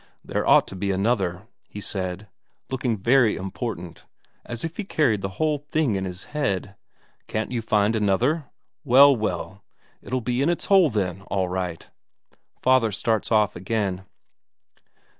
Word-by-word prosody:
"There - - -2
ought - - +6
to - - -7
be 100 +2 -2
another," 95 -2 0 0.2
he 105 - -8
said, 95 0 -4 0.4
looking 125 -4 -1
very 115 +2 +3
important, 95 -3 -6 0.4
as 120 -1 -6
if 165 +1 -5
he 210 - -2
carried 145 - +1
the 95 0 -5
whole 155 -2 +1
thing 145 -3 0
in 95 -1 -2
his 90 0 -6
head. 100 -9 -1 0.5
"Can't 110 +1 -3
you 120 -2 -1
find 110 0 +2
another? 110 - +1 0.4
Well, 140 +1 +7
well, 105 -3 -4 0.4
it'll 130 - -2
be 125 +2 -1
in 140 - +2
its 175 - -1
hole 190 -5 +5
then, 95 -5 -2
all 95 -2 0
right." 90 -2 -4 0.8
Father 130 -4 +4
starts 110 +2 -1
off 105 -2 +3
again. 95 -1 -2
110 Hz, 150 wpm, -24 LUFS, 95-130 Hz, 0.8 s, Well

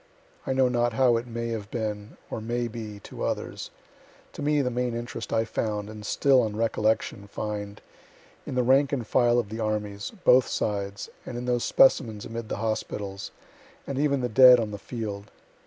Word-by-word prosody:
I - - +1
know 130 -1 +4
not 120 -1 +1
how 125 0 +4
it 120 +2 -4
may 115 0 -4
have 110 -3 -4
been, 105 -3 -4
or 110 - -3
may 120 +2 -2
be, 110 -3 -7
to - - -8
others - - -3 0.6
to - - -8
me 145 0 +2
the 125 - -1
main 125 -1 -1
interest 120 0 -5
I 115 0 +2
found, 105 -2 -3
(and 105 -1 -9
still, 130 +4 +3
on 110 -2 -2
recollection, 110 -2 0
find,) 105 0 -5 0.7
in - - -4
the 125 - +2
rank 135 +3 +4
and 130 -5 -2
file 120 +1 +3
of 115 -4 0
the 110 +2 -6
armies, 105 -2 -2
both 125 -1 +6
sides, 100 -1 -2 0.2
and 120 - -6
in 120 - -4
those 125 -1 0
specimens 110 -5 +3
amid 115 -1 -6
the - - -2
hospitals, 105 -3 -3 0.6
and 140 -1 -3
even 140 -2 +2
the 125 - 0
dead 125 +1 +8
on 110 -2 -2
the 105 - -6
field. 105 -2 -6
115 Hz, 190 wpm, -26 LUFS, 105-125 Hz, 0.7 s, dead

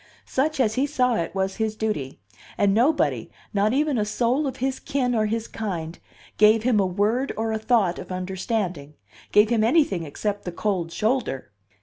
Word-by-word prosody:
Such, 300 +3 -1
as 220 -4 +2
he 265 +5 +1
saw 250 -4 +1
it, 170 -4 -2
was 190 0 -1
his 220 -1 -1
duty; 210 -12 -3 0.4
and 200 -1 +3
nobody, 265 +9 +2 0.2
not 205 +1 +2
even 285 -1 +1
a - - +2
soul 245 +7 0
of 265 - -5
his 265 +1 -2
kin 255 -3 -1
or 215 -2 +1
his 225 +1 -2
kind, 175 -6 -5 0.4
gave 215 +1 +5
him 240 -3 +3
a 195 - +2
word 210 +8 0
or 225 0 -1
a 220 - -1
thought 215 -6 +2
of - - -9
understanding, 185 - -3 0.4
gave 210 +1 +5
him 225 -2 +3
anything 235 - +3
except 200 +7 -3
the 180 - -4
cold 175 -3 -2
shoulder. 215 - -1
215 Hz, 185 wpm, -24 LUFS, 190-250 Hz, 0.4 s, gave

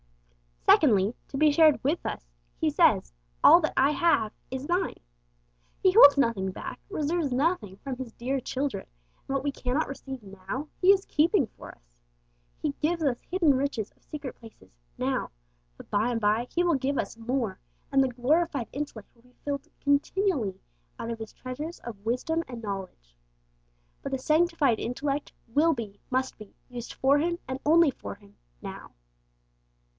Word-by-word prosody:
Secondly, 210 - +5
to 270 - -6
be 305 +1 +5
shared 310 -1 +5
with 300 +6 0
us. - - -5 0.3
He - - +2
says, - - +3 0.3
'All - - +9
that 310 - -1
I 275 +2 +5
have 270 -8 +2 0.2
is 260 +1 -4
thine.' 355 +3 -1 0.8
He 375 - +4
holds 290 -9 +9
nothing 230 -8 +1
back, 185 - -7
reserves 315 -4 -1
nothing 250 - 0
from 265 +3 -6
His 255 -3 -6
dear 265 +3 -2
children, 260 -4 -3 0.4
and 275 - -2
what 275 - -1
we 285 - 0
cannot 265 +3 -1
receive 270 -3 -7
now 200 +9 -6
He 365 - +2
is 390 -1 +2
keeping 320 - +3
for - - -13
us. - - -33 0.8
He 300 - +1
gives 330 +2 0
us 260 -5 +1
'hidden 340 -5 +3
riches 260 -5 -1
of - - -34
secret 290 -4 -7
places' 220 - -16 0.2
now, - - -1 0.5
but - - -14
by 210 +3 +2
and 235 -2 -1
by 215 +4 +2
He 350 - +1
will 345 -3 +3
give 270 +1 -1
us - - -2
more, 230 -4 -2 0.3
and 270 -1 +5
the - - +2
glorified 270 +2 0
intellect 275 -7 -6
will 235 - -26
be 250 0 -25
filled 280 -1 -3
continually 285 - +1 0.4
out 230 - -4
of 230 - -5
His 220 -1 -7
treasures 295 +7 -6
of 215 -4 -9
wisdom 320 +8 0
and 240 -3 -8
knowledge. 190 - -6 0.9
But - - -5
the - - +1
sanctified 305 -4 +2
intellect 280 +4 -2 0.2
will 300 +8 +3
be, 205 -5 -7
must 260 -1 -1
be, 215 -2 -13
used 240 -2 -7
for 275 +2 +3
Him, 340 +3 0
and 260 +1 -4
only 325 -1 +6
for - - -8
Him, 205 0 -21 0.3
now! - - -8
265 Hz, 170 wpm, -27 LUFS, 230-305 Hz, 0.9 s, All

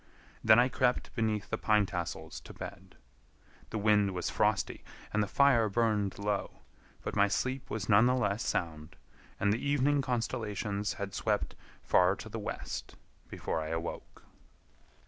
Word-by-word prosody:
Then 110 0 +7
I 120 +1 +6
crept 125 -1 0
beneath 110 -3 -1
the 110 - -1
pine 105 -1 +3
tassels 90 -3 -5
to - - -11
bed. - - -9 0.7
The 110 - -3
wind 105 -2 +3
was 90 - -2
frosty - - 0 0.3
and 105 - +2
the 105 - 0
fire 120 -2 +4
burned 105 -2 +1
low, 100 0 -3 0.4
but - - -4
my 100 - +5
sleep 130 +6 -2
was 110 -1 -3
none 105 +3 +6
the 125 - +3
less 105 -2 0
sound, 80 -2 -3 0.4
and 100 0 +3
the 115 - -3
evening 145 0 +2
constellations 110 -5 -2
had 100 -1 -5
swept 105 +1 -1 0.3
far - - +4
to - - -9
the - - -5
west - - -5 0.3
before 80 - -3
I 80 - -4
awoke. 80 +1 -5
105 Hz, 155 wpm, -31 LUFS, 100-120 Hz, 0.7 s, Then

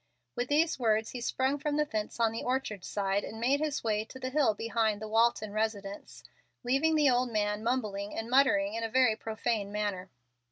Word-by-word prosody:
With 245 +1 -2
these 310 +1 +2
words 220 -2 +1
he 245 - -6
sprung 265 +4 0
from 295 0 -1
the 300 - +2
fence 215 -4 -4
on 230 -1 +3
the 225 - -4
orchard 250 -7 -2
side, 200 0 -1
and 220 - -7
made 265 +5 +2
his 300 -2 -2
way 215 -2 0
to 260 - -11
the 255 0 -4
hill 270 -7 +3
behind 225 -1 0
the 215 - -6
Walton 220 -1 +2
residence, 205 -2 -4 0.4
leaving 275 +6 +2
the 300 -2 +4
old 250 0 +1
man 210 -1 -1
mumbling 215 -5 -2
and 225 - -3
muttering 235 -6 +3
in 230 0 -3
a 225 - -2
very 250 -2 +4
profane 220 -2 -2
manner. 205 -3 -3
225 Hz, 200 wpm, -30 LUFS, 210-260 Hz, 0.4 s, the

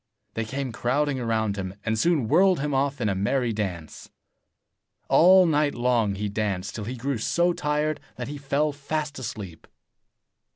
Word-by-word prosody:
They 115 - -2
came 135 +3 -4
crowding 135 +5 0
round 110 -3 0
him, 95 -1 -5
and 110 - +1
soon 160 -7 +2
whirled 185 - +4
him 145 0 -2
off 140 +1 0
in 110 - +1
a 100 - +1
merry 115 +5 0
dance. 90 -7 -5 1.0
All 185 +2 +7
night 150 -3 +1
long 120 -4 +1
he 105 +2 -3
danced, 100 -2 -2
till 105 - -5
he 125 +4 -4
grew 130 0 -2
so 175 +9 +1
tired 150 0 -1 0.2
that - - -5
he 145 +1 -6
fell 145 +2 0
fast 145 0 -4
asleep. 105 -9 -7
130 Hz, 165 wpm, -25 LUFS, 105-150 Hz, 1.0 s, All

